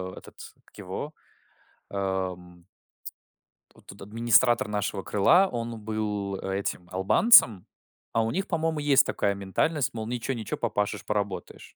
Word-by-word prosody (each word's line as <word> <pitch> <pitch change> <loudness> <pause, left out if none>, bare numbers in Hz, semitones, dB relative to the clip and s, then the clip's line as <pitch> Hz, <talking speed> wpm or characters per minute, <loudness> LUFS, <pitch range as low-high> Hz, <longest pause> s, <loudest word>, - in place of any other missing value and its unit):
э, - - -20
этот, - - -16 0.3
как - - -22
его, 100 +10 -6 0.8
эм 90 -3 -4 1.1
Вот - - -22
тут 100 +1 -12
администратор 115 +2 +2
нашего 105 -1 -2
крыла, 170 - +4
он 115 -1 -5
был, 105 -2 -3
а, 95 - -4
этим 95 -2 -4
албанцем. 100 - +5 0.5
А 115 - +2
у 115 - -1
них, 195 +2 -2
по-моему, 160 -2 -1
есть 140 -2 +4
такая 100 -1 0
ментальность, 120 - -1
мол, 110 -1 -5
ничего-ничего, 120 -1 -4
попашешь, 105 0 -2
поработаешь. 100 -2 -4
105 Hz, 135 wpm, -26 LUFS, 95-125 Hz, 1.1 s, албанцем